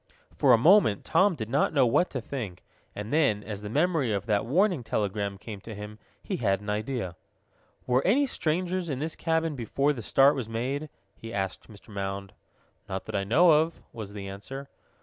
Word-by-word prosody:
For 135 - +4
a 120 - +8
moment 155 - +5
Tom 195 -2 +3
did 110 -7 -5
not 140 +6 +1
know 135 -3 +5
what 150 +9 +3
to 130 - -4
think, 110 -8 -6 0.3
and 105 +4 -5
then, 125 -10 +2
as 105 -1 -6
the 105 - -6
memory 150 -1 +1
of 100 -1 -1
that 105 0 0
warning 180 - +2
telegram 100 -2 -2
came 100 0 -8
to 110 +1 -8
him, 105 +1 -8 0.2
he - - -3
had 100 -5 +1
an 105 +1 -4
idea. 105 -4 -3 0.7
"Were 125 +1 +2
any 265 +9 +4
strangers 180 - -1
in 135 - -2
this 155 +4 -3
cabin 160 -2 0
before 140 +4 0
the 125 - -6
start 135 +6 +5
was 125 -5 -4
made?" 135 +7 -3 0.3
he 115 - -9
asked 95 -1 -3
Mr. 105 +1 -15
Mound. 100 -1 -4 0.6
"Not 95 0 -3
that - - -6
I 100 - +1
know 155 - +5
of," 160 +2 +2
was 105 -3 -7
the 100 -1 -6
answer. 135 +8 -8
120 Hz, 195 wpm, -28 LUFS, 105-150 Hz, 0.7 s, a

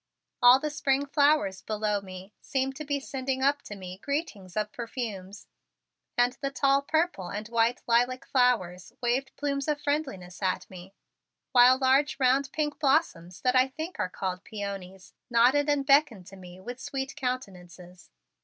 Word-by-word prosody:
All 245 +2 +8
the 300 +1 -3
spring 280 -1 0
flowers 285 -9 +2
below 210 -1 -1
me 190 +1 -11
seemed 270 -1 -2
to 305 - -5
be 285 -1 -2
sending 265 -1 -3
up 285 +1 +2
to 205 - -9
me 185 -1 -9
greetings 215 - -4
of 210 0 -1
perfumes 220 -5 -6 0.7
and 245 0 +3
the 275 - -1
tall 275 0 +2
purple 315 - -1
and 210 +3 -5
white 235 +1 +1
lilac 245 +2 +1
flowers 205 -9 +1
waved 255 +3 0
plumes 280 -1 -2
of 300 -1 0
friendliness 270 - -3
at 185 -1 -1
me, 185 +1 -12 0.6
while 250 +1 +7
large 270 +2 +2
round 265 +1 +2
pink 295 -1 -2
blossoms 265 - 0
that 250 0 +2
I 255 +1 +5
think 315 +7 -7
are - - 0
called 185 0 -4
peonies, 195 -3 -7 0.2
nodded 255 +5 +4
and 285 -1 +1
beckoned 275 - +3
to 195 - -12
me 180 -1 -12
with 245 +6 -8
sweet 265 0 -5
countenances. 180 - -6
250 Hz, 160 wpm, -28 LUFS, 195-275 Hz, 0.7 s, All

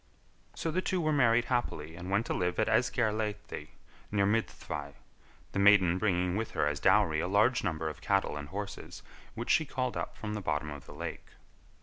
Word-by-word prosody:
So 165 - -2
the 185 +4 0
two 185 0 -1
were 155 -2 +1
married 120 -4 +4
happily 80 - -2
and 90 +2 -7
went 100 +4 +1
to - - -2
live 90 0 -1
at - - +2
Esgair 115 -1 +2
Laethdy, 105 -8 -4 0.4
near 100 -1 +2
Myddfai, 75 -9 -2 0.6
the - - -2
maiden 95 -3 +5
bringing 90 -3 +1
with 110 +2 -2
her - - +1
as 75 -1 -1
dowry 95 -3 +4
a 85 - -1
large 110 +6 +3
number 80 -4 -1
of 75 - -6
cattle 100 -5 +1
and 75 0 -6
horses 100 +2 -6 0.3
which 115 - -2
she - - +4
called 130 -4 -2
up - - -4
from 105 -1 -4
the 105 - -3
bottom 75 -3 -2
of 70 -2 -9
the - - -10
lake. - - -6
100 Hz, 200 wpm, -31 LUFS, 85-115 Hz, 0.6 s, maiden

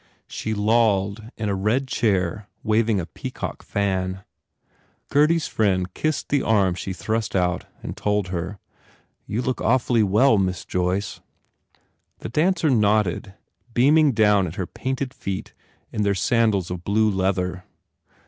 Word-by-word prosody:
She 110 0 -4
lolled 105 -1 +1
in 110 - -2
a 100 - 0
red 110 +8 0
chair 100 -5 0 0.2
waving 110 -1 +2
a 85 - -3
peacock - - -6
fan. 95 -1 -2 0.9
Gurdy 150 +4 +4
s 165 - -1
friend 95 -4 0
kissed 155 -1 -2
the 140 -2 +2
arm 100 -5 +2
she 95 +2 -5
thrust 110 +2 -2
out 90 -1 0 0.2
and - - -5
told 105 -2 -1
her, 90 +3 -4 0.7
"You 115 +4 -2
look 130 0 -2
awfully 120 -1 +2
well, 105 +3 +4
Miss 90 -2 -1
Joyce." 90 +2 -2 1.0
The - - -7
dancer 160 +3 +2
nodded, 105 -4 +1 0.4
beaming 145 +3 +5
down 105 -4 +4
at 80 - -7
her 95 -4 -2
painted 130 +5 -4
feet 95 -1 -5 0.4
in 105 - -2
their 100 -1 +2
sandals 105 -2 +1
of 90 -1 -5
blue 110 +2 +2
leather. 95 -2 -1
105 Hz, 140 wpm, -23 LUFS, 95-115 Hz, 1.0 s, beaming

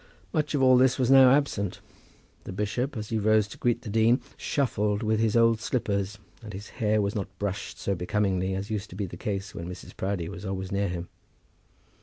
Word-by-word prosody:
Much 150 -1 0
of 135 - +2
all 130 -1 +7
this 130 0 +4
was 130 -1 +2
now 135 -1 +9
absent. 130 -9 +1 0.7
The - - -6
bishop, 115 +8 -2
as 105 -1 -5
he 110 - 0
rose 110 0 +3
to - - -10
greet 120 0 +1
the 115 - -6
dean, 115 +4 +4 0.2
shuffled 105 -6 0
with 110 0 +1
his 110 0 +2
old 115 -1 +4
slippers, 100 -5 -1 0.2
and 105 -2 -9
his 100 +2 -8
hair 110 0 +3
was 100 -1 0
not 95 -2 -5
brushed 100 0 -4
so 100 - -1
becomingly 95 0 0
as 100 +3 -4
used 105 -2 -3
to - - -10
be 100 +1 -2
the 90 - -8
case 100 +2 -4
when 85 +1 -6
Mrs. 90 - -9
Proudie 95 -3 -2
was 85 +3 -8
always 95 -1 -4
near 100 0 +1
him. 85 0 -4
105 Hz, 210 wpm, -27 LUFS, 95-115 Hz, 0.7 s, now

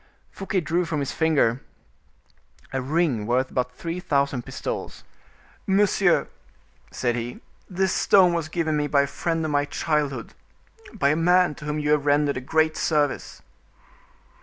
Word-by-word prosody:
Fouquet 195 -1 -2
drew 170 +2 0
from 160 -3 -3
his 140 - -2
finger 145 -6 +1 1.1
a 135 - -1
ring 135 -6 0
worth 130 +2 0
about 125 0 -1
three 165 +7 -5
thousand 140 -7 0
pistoles. - - -6 0.6
"Monsieur," 195 -2 +3 0.6
said 120 -2 -1
he, 120 +1 -5 0.3
"this 190 0 0
stone 185 -3 +4
was 165 -2 -2
given 160 -2 -1
me 150 0 0
by 140 -1 +3
a - - 0
friend 165 +3 -2
of 155 - -2
my 145 0 +2
childhood, 145 -5 -2 0.6
by 175 -11 +1
a 150 - +2
man 180 +1 +3
to 150 - -11
whom 150 0 -2
you 150 0 0
have 150 -1 +2
rendered 145 -1 +2
a - - -4
great 160 +4 +1
service." 150 -3 -1
150 Hz, 155 wpm, -24 LUFS, 140-170 Hz, 1.1 s, stone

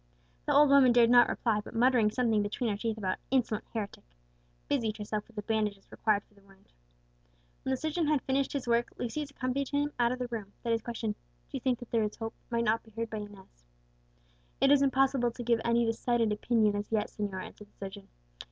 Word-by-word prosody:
The - - +2
old 295 0 +7
woman 275 -3 +7
dared 240 -1 +5
not 245 -1 +7
reply, 215 -3 0
but - - -11
muttering 240 -2 +4
something 225 -2 +1
between 215 +3 -1
her - - -1
teeth 225 0 -2
about 190 -3 -2
"insolent 245 -5 0
heretic," 210 -3 -5 0.6
busied 225 -6 0
herself 210 0 -4
with 230 - -21
the 210 - -4
bandages 210 -2 -2
required 210 -2 +1
for - - -31
the 200 - -22
wound. 195 0 -23 0.9
When - - -4
the 265 - +1
surgeon 315 +3 -1
had 300 -3 +2
finished 270 +1 0
his 275 -4 -3
work, 235 0 +2
Lucius 285 +5 -3
accompanied 270 0 -2
him 290 0 0
out 240 0 +3
of 255 - -2
the 250 -1 -3
room, 215 -4 -6
that 235 - -1
his 225 - 0
question, 230 -1 -3
"Do - - -9 0.3
you - - -3
think 255 -2 +1
that 245 -1 -11
there 230 - +2
is 210 -1 -2
hope?" 225 0 -5 0.2
might 235 -1 0
not 225 +1 +2
be 225 - -19
heard 225 +1 -5
by 220 - -3
Inez. 195 - -11 0.9
"It 275 - +4
is 285 -1 +6
impossible 270 -2 +3
to 240 +1 -7
give 235 -1 +2
any 235 0 +2
decided 230 0 +1
opinion 210 0 +2
as 205 +1 -4
yet, 215 -2 0
señor," 200 -3 -4
answered 210 - -12
the - - -33
surgeon. 195 0 -8
230 Hz, 220 wpm, -30 LUFS, 210-255 Hz, 0.9 s, old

